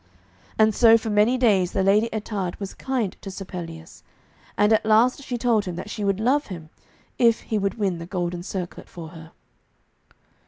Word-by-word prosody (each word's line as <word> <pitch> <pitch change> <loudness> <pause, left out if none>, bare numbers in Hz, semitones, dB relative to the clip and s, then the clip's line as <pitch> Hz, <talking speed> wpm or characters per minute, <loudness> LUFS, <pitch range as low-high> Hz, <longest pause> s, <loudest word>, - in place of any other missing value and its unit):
And 220 0 +4
so 230 +1 +6
for 220 -1 -4
many 210 +5 +3
days 200 -8 +2
the 190 - +1
Lady 210 +4 +3
Ettarde 205 -4 -4
was 195 -2 -6
kind 250 -8 -2
to 195 - -7
Sir 195 0 -7
Pelleas, 165 -3 -9 0.6
and 210 +1 +4
at 220 - +3
last 225 +5 +3
she 250 -3 -4
told 230 -3 +1
him 180 -2 -4
that 210 - -7
she 210 - -4
would 200 0 0
love 270 +6 +1
him 165 -5 -9 0.5
if 235 -2 +4
he 220 - -2
would 195 -1 -1
win 195 -6 -1
the 165 - -8
golden 175 -2 -3
circlet 180 -1 -6
for 165 -2 -9
her. 160 -1 -12
205 Hz, 190 wpm, -24 LUFS, 180-225 Hz, 0.6 s, so